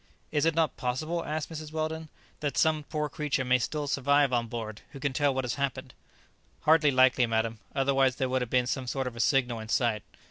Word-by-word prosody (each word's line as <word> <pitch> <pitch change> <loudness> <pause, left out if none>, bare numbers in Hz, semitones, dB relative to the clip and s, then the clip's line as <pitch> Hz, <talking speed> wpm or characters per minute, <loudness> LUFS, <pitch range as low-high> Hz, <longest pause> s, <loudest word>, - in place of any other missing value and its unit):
"Is 150 0 +1
it 165 -1 +2
not 160 -4 +1
possible," 155 +7 -2
asked 155 +1 -4
Mrs 155 -1 -7
Weldon, 160 0 -3 0.3
"that 145 -2 -2
some 155 -2 +2
poor 150 +1 -2
creature 145 -2 -2
may 125 0 +3
still 150 +4 -2
survive 140 -1 +2
on 120 -1 +1
board, 110 -2 -6
who 140 - -8
can 140 -1 -1
tell 145 +1 +2
what 130 0 -1
has 125 - -2
happened?" 140 -3 -3 0.7
"Hardly 155 -1 +5
likely, 130 -2 +4
madam; 115 0 -1 0.2
otherwise 135 -1 +2
there 130 - -1
would 130 0 0
have 125 - -3
been 125 0 +2
some 130 +1 -3
sort 135 +2 -2
of 125 -2 -5
a - - -8
signal 125 -1 +2
in 110 0 -8
sight. 115 -3 +1
135 Hz, 215 wpm, -28 LUFS, 125-150 Hz, 0.7 s, Hardly